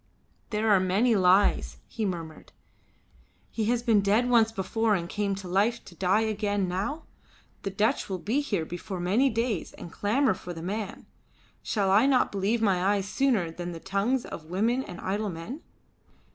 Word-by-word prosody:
"There 215 0 -1
are 200 - +6
many 200 +6 +2
lies," 190 +1 +3
he 220 - -3
murmured. 165 -4 -7 1.0
"He 220 - -2
has 235 +1 +1
been 225 -4 +4
dead 210 +5 +2
once 230 -2 +4
before, 225 +1 0
and 170 -2 -3
came 200 +1 -1
to 195 -1 -8
life 210 +6 +1
to - - -12
die 190 +4 +2
again 205 -3 0
now. 200 - -3 0.6
The 195 - -3
Dutch 215 +7 0
will 190 - -2
be 225 - 0
here 200 - -2
before 175 +3 -6
many 205 +10 +2
days 230 -5 -2
and 170 - -10
clamour 240 +4 +1
for 180 -1 -8
the 165 -1 -8
man. 205 +3 -4 0.6
Shall 200 -3 0
I 215 +7 +5
not 265 -2 +3
believe 205 +4 0
my 185 -4 +2
eyes 200 -1 -2
sooner 220 -9 +1
than 175 +1 -6
the 165 - -7
tongues 200 +8 0
of 155 - -8
women 225 +8 +1
and 180 -8 -8
idle 205 +2 -2
men?" 180 - -7
205 Hz, 175 wpm, -27 LUFS, 185-230 Hz, 1.0 s, are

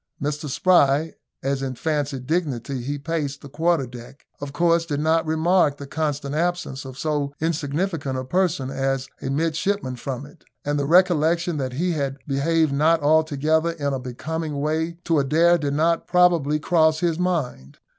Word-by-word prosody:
Mr 150 +1 -3
Spry, 150 0 +3 0.3
as 135 0 -1
in 130 -1 -3
fancied 145 -2 -2
dignity 140 -5 -2
he 140 +4 -3
paced 145 -2 -3
the 140 - -9
quarter 165 -1 +1
deck, 125 +2 -12
of 145 -1 -6
course 170 +2 +2
did 150 -4 -3
not 160 +1 +1
remark 160 -1 +2
the 140 - -8
constant 145 -1 -3
absence 165 -4 -2
of 130 -1 -9
so 145 -1 -2
insignificant 155 -2 -2
a 130 - -3
person 160 -3 0
as 135 0 -1
a - - -3
midshipman 160 0 -1
from 130 +1 -5
it; 150 +3 -17 0.2
and 145 0 0
the 140 - -1
recollection 170 -1 +3
that 130 -3 -3
he 175 +7 0
had 140 -4 -2
behaved 155 +2 +1
not 160 +4 +3
altogether 155 +2 +2
in 145 -4 -2
a 135 - -2
becoming 150 +4 -4
way 160 +3 -1
to 165 -3 +2
Adair 165 +5 +3
did 145 -2 -1
not 165 +2 +1
probably 170 -5 +3
cross 160 -1 +2
his 170 -1 0
mind. 150 - -2
150 Hz, 165 wpm, -23 LUFS, 140-165 Hz, 0.3 s, Spry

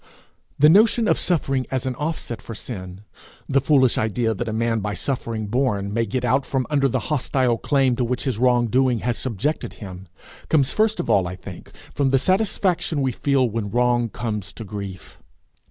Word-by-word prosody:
The 150 - +6
notion 215 +6 +5
of - - +2
suffering 135 -7 0
as 130 0 -2
an 130 - -1
offset 150 -5 -4
for 115 - -8
sin, 95 -5 -7 0.5
the 135 0 +2
foolish 130 -3 +3
idea 110 +1 0
that 110 - -4
a - - -2
man 115 +1 0
by 105 -1 -3
suffering 115 -2 -3
borne 105 -4 -1
may 115 0 0
get 130 +5 -2
out 135 +1 +2
from 130 -2 -1
under 140 -2 +3
the - - -1
hostile 125 -4 +1
claim 135 -3 +2
to 125 - +1
which 125 +2 -2
his 130 -6 -2
wrong 125 -1 +3
doing 125 0 +1
has 120 -1 -1
subjected 130 +5 -2
him, 95 -2 -10 0.4
comes 140 -4 +3
first 220 0 +1
of - - -2
all, 95 -3 +3
I 90 - -5
think, 90 -1 -11 0.2
from 140 -2 +1
the 135 - +4
satisfaction 185 -3 +1
we 130 - +1
feel 135 +1 +1
when 110 -2 -3
wrong 120 +1 +1
comes 105 -3 -4
to 115 - -8
grief. 100 -3 -8
125 Hz, 190 wpm, -22 LUFS, 110-135 Hz, 0.5 s, The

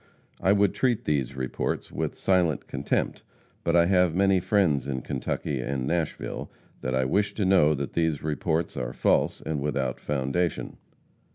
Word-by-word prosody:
I 95 - +4
would 100 -1 +3
treat 125 -4 0
these 70 -4 0
reports 65 -1 -3
with - - -3
silent 90 -6 +1
contempt, - - -2 0.4
but 85 - +1
I 85 0 +6
have 90 -2 +3
many 95 0 +4
friends 90 -8 +2
in 65 -3 -3
Kentucky 65 +1 -3
and 65 0 -2
Nashville 80 +2 -3 0.3
that 65 +1 -1
I 65 0 +2
wish 100 +10 +1
to 105 - 0
know 90 -5 +5
that 70 0 -4
these 80 -3 0
reports 80 +2 -1
are - - -3
false - - +1
and 75 -3 -3
without 70 -3 -1
foundation. 75 +5 -1
80 Hz, 160 wpm, -26 LUFS, 70-90 Hz, 0.4 s, I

